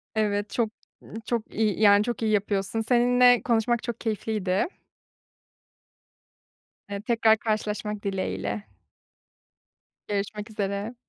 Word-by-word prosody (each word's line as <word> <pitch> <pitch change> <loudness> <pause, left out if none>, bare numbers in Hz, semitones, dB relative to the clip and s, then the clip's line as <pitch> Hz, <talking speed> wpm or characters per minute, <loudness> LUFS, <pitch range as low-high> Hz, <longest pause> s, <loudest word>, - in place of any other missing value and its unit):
Evet. 205 -1 0
Çok, 230 -3 0 0.3
ııı, - - -14
çok 235 -2 -3
iyi, 215 -2 +1
yani, 205 -1 +6
çok 240 +1 -3
iyi 220 -1 +1
yapıyorsun. 205 +1 0
Seninle 245 +1 +4
konuşmak 235 0 +1
çok 235 -1 -4
keyifliydi. 210 - -1 2.2
Eee, 200 0 -4
tekrar 225 -1 +3
karşılaşmak 210 -1 -2
dileğiyle. 100 - -2 1.4
Görüşmek 205 +1 -3
üzere. 205 +2 -3
215 Hz, 105 wpm, -26 LUFS, 200-230 Hz, 2.2 s, yani